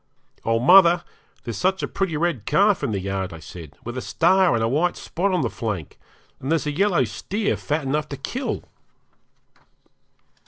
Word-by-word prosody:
'Oh, 115 Hz, 0 st, +1 dB
mother! 175 Hz, +6 st, +6 dB, 0.4 s
there's 115 Hz, -3 st, -5 dB
such 190 Hz, +1 st, +1 dB
a -, -, 0 dB
pretty 190 Hz, -6 st, -2 dB
red 155 Hz, -, -1 dB
calf 200 Hz, +6 st, +3 dB
in 140 Hz, -, -1 dB
the 100 Hz, -3 st, -1 dB
yard,' 95 Hz, 0 st, -3 dB
I 80 Hz, -, -8 dB
said, 80 Hz, -1 st, -11 dB
'with 120 Hz, +1 st, -6 dB
a -, -, -6 dB
star 185 Hz, +3 st, +3 dB
and 115 Hz, -, 0 dB
a -, -, +2 dB
white 155 Hz, +9 st, +1 dB
spot 190 Hz, +4 st, -2 dB
on 180 Hz, -2 st, +1 dB
the 120 Hz, -, 0 dB
flank; 105 Hz, -9 st, -5 dB, 0.4 s
and 135 Hz, -, -4 dB
there's 165 Hz, -2 st, +1 dB
a 150 Hz, -, -1 dB
yellow 180 Hz, -1 st, +2 dB
steer 195 Hz, -, -2 dB
fat 150 Hz, +1 st, -2 dB
enough 150 Hz, +3 st, -1 dB
to 140 Hz, -, -5 dB
kill!' 250 Hz, -, -4 dB
150 Hz, 185 wpm, -23 LUFS, 115-180 Hz, 0.4 s, mother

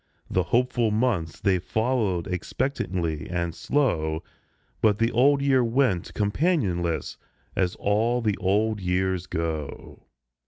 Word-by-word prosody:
The 95 Hz, -, +2 dB
hopeful 120 Hz, +5 st, +1 dB
months 105 Hz, -8 st, 0 dB
they 95 Hz, -2 st, +2 dB
followed 110 Hz, -4 st, 0 dB
expectantly 90 Hz, -, -2 dB
and 85 Hz, -1 st, -2 dB
slow; 80 Hz, -, 0 dB, 0.6 s
But 105 Hz, -2 st, +4 dB
the 115 Hz, +2 st, +1 dB
Old 140 Hz, +4 st, +4 dB
Year 135 Hz, -2 st, +4 dB
went 115 Hz, -6 st, +1 dB
companionless, 105 Hz, -, 0 dB, 0.4 s
as 90 Hz, -2 st, 0 dB
all 110 Hz, +4 st, +1 dB
the 110 Hz, -4 st, 0 dB
Old 105 Hz, +3 st, +1 dB
Years 90 Hz, 0 st, 0 dB
go. 80 Hz, -3 st, -5 dB
100 Hz, 115 wpm, -25 LUFS, 85-120 Hz, 0.6 s, But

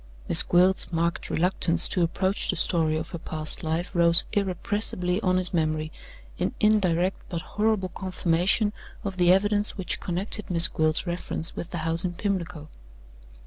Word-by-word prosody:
Miss -, -, +10 dB
Gwilt's 180 Hz, +2 st, +2 dB
marked 170 Hz, 0 st, -2 dB
reluctance 170 Hz, 0 st, +3 dB
to 180 Hz, -, -1 dB
approach 185 Hz, +3 st, -1 dB
the -, -, 0 dB
story 160 Hz, -3 st, 0 dB
of 160 Hz, +1 st, -7 dB
her 170 Hz, -, -7 dB
past 155 Hz, -1 st, -5 dB
life 160 Hz, +2 st, -3 dB
rose 170 Hz, -1 st, +3 dB
irrepressibly 190 Hz, -1 st, -1 dB
on 185 Hz, -2 st, 0 dB
his 185 Hz, 0 st, 0 dB
memory, 155 Hz, -2 st, -2 dB, 0.5 s
in -, -, -3 dB
indirect 190 Hz, -4 st, +1 dB
but 170 Hz, -2 st, -5 dB
horrible 210 Hz, -3 st, -2 dB
confirmation 185 Hz, +3 st, -1 dB, 0.3 s
of 195 Hz, -2 st, -6 dB
the 175 Hz, -1 st, +3 dB
evidence 205 Hz, +2 st, +1 dB
which 190 Hz, -, -3 dB
connected 195 Hz, +4 st, +2 dB
Miss 170 Hz, -1 st, +6 dB
Gwilt's 155 Hz, +2 st, 0 dB
reference 170 Hz, -2 st, -4 dB
with 175 Hz, -, -7 dB
the 175 Hz, -, -6 dB
house 165 Hz, +2 st, +1 dB
in 180 Hz, -1 st, -3 dB
Pimlico. 175 Hz, -5 st, -5 dB
180 Hz, 155 wpm, -24 LUFS, 165-190 Hz, 0.5 s, Miss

